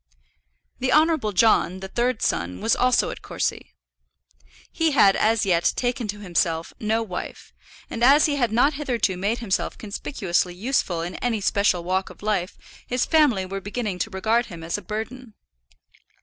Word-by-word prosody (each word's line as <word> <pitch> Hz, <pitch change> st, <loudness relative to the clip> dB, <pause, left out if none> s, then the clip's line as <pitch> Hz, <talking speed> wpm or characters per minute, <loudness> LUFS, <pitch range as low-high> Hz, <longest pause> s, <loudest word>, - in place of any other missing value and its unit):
The 255 Hz, 0 st, 0 dB
Honourable 310 Hz, -8 st, +3 dB
John, 190 Hz, -2 st, +3 dB
the 190 Hz, -, -6 dB
third 240 Hz, +3 st, -1 dB
son, 85 Hz, +2 st, -1 dB
was 225 Hz, -, +2 dB
also 250 Hz, 0 st, +2 dB
at -, -, -9 dB
Courcy. -, -, -4 dB, 1.0 s
He 325 Hz, -2 st, +1 dB
had 200 Hz, -7 st, +5 dB
as 220 Hz, 0 st, +2 dB
yet 175 Hz, -3 st, +2 dB
taken 245 Hz, -2 st, -1 dB
to 205 Hz, 0 st, -5 dB
himself 170 Hz, -3 st, -1 dB
no 220 Hz, +1 st, 0 dB
wife, 180 Hz, -5 st, -7 dB, 0.3 s
and 235 Hz, -, -4 dB
as 280 Hz, +4 st, +6 dB
he 295 Hz, -, +1 dB
had 240 Hz, -5 st, +1 dB
not 250 Hz, +7 st, +3 dB
hitherto 250 Hz, -9 st, -1 dB
made 200 Hz, +6 st, -1 dB
himself 220 Hz, -6 st, -2 dB
conspicuously 195 Hz, -5 st, -2 dB
useful 185 Hz, -6 st, -1 dB
in 175 Hz, +2 st, -5 dB
any 235 Hz, -3 st, -1 dB
special 200 Hz, -3 st, +1 dB
walk 185 Hz, +2 st, -1 dB
of -, -, -15 dB
life 200 Hz, -4 st, -1 dB, 0.3 s
his 250 Hz, +1 st, 0 dB
family 285 Hz, -, +3 dB
were 195 Hz, +1 st, -5 dB
beginning 205 Hz, -2 st, -4 dB
to 220 Hz, -, -1 dB
regard 220 Hz, +5 st, 0 dB
him 170 Hz, -5 st, -9 dB
as 165 Hz, -, -3 dB
a 205 Hz, -, -4 dB
burden. 220 Hz, +2 st, -6 dB
215 Hz, 165 wpm, -23 LUFS, 185-245 Hz, 1.0 s, as